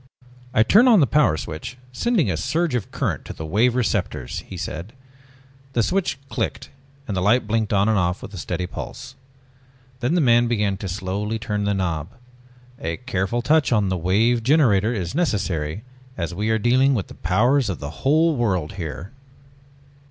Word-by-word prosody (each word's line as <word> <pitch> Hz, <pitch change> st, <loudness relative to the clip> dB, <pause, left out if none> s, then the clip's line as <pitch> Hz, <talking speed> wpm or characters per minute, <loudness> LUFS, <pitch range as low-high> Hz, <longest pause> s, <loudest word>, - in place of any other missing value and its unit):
"I 110 Hz, -, +4 dB
turn 215 Hz, -, +5 dB
on 230 Hz, -5 st, +7 dB
the 145 Hz, -, +5 dB
Power 140 Hz, -, +3 dB
Switch, 80 Hz, +11 st, -6 dB
sending 180 Hz, -, +1 dB
a -, -, -1 dB
surge 165 Hz, -3 st, -1 dB
of 120 Hz, -6 st, -2 dB
current -, -, -2 dB
to -, -, -7 dB
the 80 Hz, -, -7 dB
Wave 115 Hz, +9 st, +2 dB
Receptors," 100 Hz, -, -1 dB
he -, -, -10 dB
said. 85 Hz, +9 st, -6 dB, 0.8 s
The 115 Hz, -, +2 dB
switch 185 Hz, -, 0 dB
clicked -, -, -3 dB, 0.4 s
and 100 Hz, -, -3 dB
the 95 Hz, -, 0 dB
light 110 Hz, +6 st, +3 dB
blinked 110 Hz, 0 st, 0 dB
on 100 Hz, 0 st, +3 dB
and 110 Hz, -2 st, +3 dB
off 90 Hz, 0 st, -1 dB
with 105 Hz, -, -9 dB
a 95 Hz, -, -6 dB
steady 90 Hz, +1 st, -3 dB
pulse. 125 Hz, +7 st, -8 dB, 0.9 s
Then 130 Hz, +7 st, 0 dB
the -, -, +3 dB
man 120 Hz, -4 st, +4 dB
began 105 Hz, -4 st, 0 dB
to 100 Hz, -, -5 dB
slowly 100 Hz, +4 st, -3 dB
turn 105 Hz, -2 st, -2 dB
the 100 Hz, 0 st, +1 dB
knob. 85 Hz, -4 st, -2 dB, 0.7 s
"A 80 Hz, +1 st, -3 dB
careful 120 Hz, -2 st, -2 dB
touch 155 Hz, 0 st, +3 dB
on 105 Hz, -5 st, +2 dB
the 95 Hz, -, 0 dB
Wave 105 Hz, +8 st, +2 dB
Generator 115 Hz, -6 st, +3 dB
is 95 Hz, -6 st, -3 dB
necessary 100 Hz, -, -1 dB, 0.3 s
as 85 Hz, -1 st, -3 dB
we 105 Hz, +5 st, -2 dB
are 110 Hz, -, +3 dB
dealing 130 Hz, +4 st, +3 dB
with 100 Hz, -, -1 dB
the -, -, -12 dB
powers 120 Hz, +8 st, +2 dB
of 90 Hz, -, -2 dB
the 70 Hz, +1 st, -7 dB
whole 155 Hz, +3 st, +3 dB
world 95 Hz, -, 0 dB
here...." 85 Hz, +5 st, -6 dB
110 Hz, 180 wpm, -22 LUFS, 95-125 Hz, 0.9 s, on